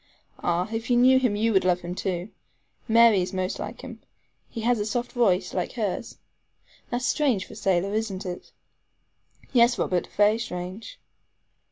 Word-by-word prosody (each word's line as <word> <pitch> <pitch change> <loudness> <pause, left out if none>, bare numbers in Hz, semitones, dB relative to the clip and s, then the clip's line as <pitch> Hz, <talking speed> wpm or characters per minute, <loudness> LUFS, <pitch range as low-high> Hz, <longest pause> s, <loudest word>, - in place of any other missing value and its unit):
Ah! 175 +1 0
if 225 +2 -4
you 245 - +4
knew 260 +2 +6
him 250 -5 +1
you 225 +2 +1
would 190 - +3
love 180 -1 +1
him, 175 +1 -5
too. 185 0 -3 0.6
Mary 230 -3 +5
is 180 - -4
most 185 0 -2
like - - -6
him. - - -10 0.5
He 230 - -6
has 235 0 +2
a 205 - -1
soft 245 +3 -2
voice, 195 -6 +1
like 180 - -2
hers. 215 -2 -3 0.7
That's 245 +1 -2
strange 260 -12 +1
for - - -13
a - - -11
sailor, 190 +1 0
isn't 215 -3 -3
it?" 180 -1 -7 1.0
"Yes, 240 -1 +5
Robert, 180 -1 -1
very 210 +2 +4
strange." 190 - -6
210 Hz, 170 wpm, -25 LUFS, 185-235 Hz, 1.0 s, knew